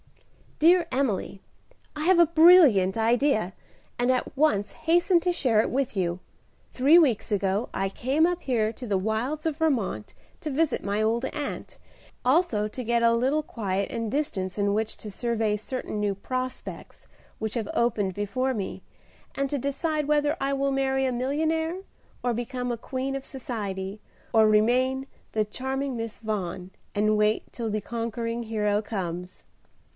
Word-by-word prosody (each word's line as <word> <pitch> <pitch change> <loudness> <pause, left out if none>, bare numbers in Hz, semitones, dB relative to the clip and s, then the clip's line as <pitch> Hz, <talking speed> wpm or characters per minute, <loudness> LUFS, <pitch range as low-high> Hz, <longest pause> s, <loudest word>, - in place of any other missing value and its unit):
"Dear 345 +3 +5
Emily, 240 -7 -1 0.5
I 305 +1 -3
have 370 0 +5
a 340 - +8
brilliant 315 - +6
idea, 225 -3 +2 0.5
and 245 +1 +3
at 255 +2 -1
once 260 -9 +2
hasten 345 +2 +3
to 360 - +1
share 250 -11 +2
it - - -2
with 265 -3 -1
you. 175 -1 0 0.5
Three 280 +6 +5
weeks 250 -10 +2
ago 200 +2 0
I 195 0 -1
came 270 +10 +1
up 355 0 -2
here 225 -5 +1
to 250 - -8
the 200 -2 +1
wilds 225 +10 -2
of 310 -2 -2
Vermont 245 - -1 0.3
to 310 - -4
visit 315 +3 0
my 205 +1 -1
old 230 +3 +1
aunt, 295 0 -5 0.5
also 255 - +2
to 250 +4 -6
get 235 0 +1
a 230 0 +5
little 265 +6 +2
quiet 200 -7 -3
and 230 -2 -3
distance 195 -11 -2
in 200 0 +1
which 220 0 -2
to 215 - -8
survey 225 -1 0
certain 215 0 -4
new 205 -1 +1
prospects 255 +5 -5 0.3
which 220 0 -3
have 225 -4 -2
opened 210 -5 +1
before 255 +6 -1
me, 200 -3 -5 0.5
and 275 0 -1
to 290 - 0
decide 295 +3 -1
whether 295 0 +2
I 275 0 0
will 275 0 0
marry 270 0 +1
a 260 - +1
millionnaire 320 +7 -1 0.4
and 245 -1 +1
become 245 +1 -3
a 235 - -2
queen 260 +3 -3
of 275 - -5
society, 205 -6 -5 0.3
or 220 -1 +6
remain 255 +5 +2 0.2
'the 215 -1 +1
charming 265 +4 -3
Miss 230 -1 -5
Vaughan' 190 -4 -4 0.2
and 215 +1 +2
wait 210 +1 +1
till 230 -2 -4
the 215 0 -1
conquering 230 +1 -3
hero 210 -2 0
comes. 180 -4 -5
235 Hz, 160 wpm, -26 LUFS, 210-275 Hz, 0.5 s, a